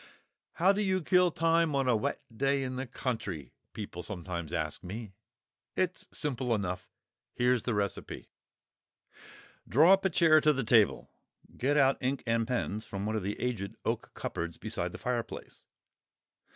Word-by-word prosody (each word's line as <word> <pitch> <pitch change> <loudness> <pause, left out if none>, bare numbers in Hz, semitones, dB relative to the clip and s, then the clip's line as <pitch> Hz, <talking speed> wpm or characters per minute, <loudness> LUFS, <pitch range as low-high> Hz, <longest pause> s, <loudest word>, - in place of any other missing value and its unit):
"How 185 +3 +4
do 200 +1 0
you 190 -3 +1
kill 180 +1 +4
time 165 -1 +2
on 135 -1 +1
a 125 - +4
wet 110 - -2
day 135 +2 +1
in 130 0 -3
the 130 +1 -4
country?" 110 - -4 0.2
people 100 -5 -6
sometimes 85 -3 -5
ask - - -2
me. 105 +2 -7 0.6
It's 185 -1 -1
simple 130 -5 0
enough. 90 -3 -3 0.5
Here 125 +1 +3
is 125 - 0
the 115 -1 -1
recipe: 100 -1 -3 0.7
* - - -21
Draw 155 - +7
up 195 - +3
a 190 - +3
chair 155 -2 +5
to 150 0 +4
the 135 -1 -1
table; 110 -3 +3 0.4
get 145 +4 +1
out 135 -1 +4
ink 135 +1 -1
and 115 -1 +1
pens 110 -4 -1
from 100 -2 -5
one 110 +1 -1
of 110 - 0
the 100 +2 -3
aged 110 -6 -2
oak - - -1
cupboards 85 0 -4
beside - - -3
the - - -7
fireplace. 120 -2 -4
125 Hz, 165 wpm, -30 LUFS, 105-150 Hz, 0.7 s, Draw